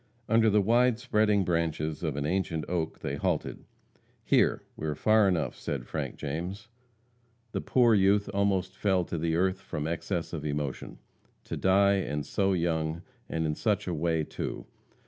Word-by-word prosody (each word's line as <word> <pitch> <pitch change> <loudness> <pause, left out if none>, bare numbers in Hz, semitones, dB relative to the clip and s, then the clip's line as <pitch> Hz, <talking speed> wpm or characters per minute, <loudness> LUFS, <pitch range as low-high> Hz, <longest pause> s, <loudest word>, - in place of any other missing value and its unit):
Under 115 0 +4
the 105 -1 +3
wide 120 +2 +3
spreading 105 -5 +2
branches 80 -2 -1
of 80 -5 -2
an 70 0 -2
ancient 85 -2 -1
oak 85 -3 -2
they 70 - -3
halted. - - -2 0.6
"Here! - - +2
we 80 - -4
are 75 - -1
far 110 +4 +4
enough," 85 -5 0
said - - -4
Frank - - -4
James. 90 +10 -5 0.8
The - - -2
poor 120 -3 +4
youth 100 0 +3
almost 95 -2 0
fell 95 -2 +1
to 85 - -4
the 80 0 0
earth 95 +2 +1
from 75 - -4
excess 85 +2 -3
of 80 -3 -4
emotion. 75 -2 -4 0.5
To - - -5
die, 100 +1 +4
and 75 -6 -2
so 95 +3 +1
young, 80 -1 -1 0.3
and 80 0 -1
in 75 - 0
such 105 +4 0
a 90 - -1
way, 80 0 0
too! - - -5
90 Hz, 165 wpm, -29 LUFS, 80-100 Hz, 0.8 s, Under